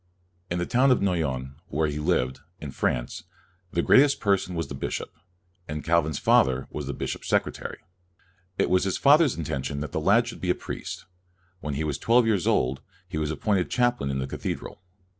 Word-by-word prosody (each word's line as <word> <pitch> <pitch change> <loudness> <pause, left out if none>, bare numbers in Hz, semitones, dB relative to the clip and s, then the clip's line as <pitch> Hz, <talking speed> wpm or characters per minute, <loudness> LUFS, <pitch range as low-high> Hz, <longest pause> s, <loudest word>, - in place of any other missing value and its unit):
In 85 - -1
the 85 - -1
town 130 +7 +3
of 130 - +4
Noyon, 70 -8 -1
where 80 +1 0
he 75 0 -3
lived, 65 -3 0 0.2
in 75 -3 -6
France, - - -2 0.5
the 85 - 0
greatest 140 +1 +5
person 100 -3 +1
was 80 -3 -2
the 70 - -7
bishop, 70 - -4 0.6
and 75 0 -5
Calvin's 80 -3 +1
father 65 0 +3
was 75 -3 -5
the 70 - -3
bishop's - - -4
secretary. - - -1 0.8
It - - +1
was 90 0 +4
his 95 -1 0
father's 145 0 +5
in 85 - -3
tention 70 0 -3
that 75 -2 -5
the - - -1
lad - - +4
should - - -8
be - - -2
a - - +3
priest. - - -7 0.5
When 75 -5 -4
he 75 - -1
was 75 -3 -2
twelve 120 +1 +4
years 105 -6 +1
old, 65 +2 +1 0.3
he 80 -4 -4
was 75 -1 -1
appointed 95 +3 0
chaplain 120 - +1
in 70 - -1
the 65 - -2
cathedral. 75 - -5
80 Hz, 195 wpm, -26 LUFS, 70-100 Hz, 0.8 s, greatest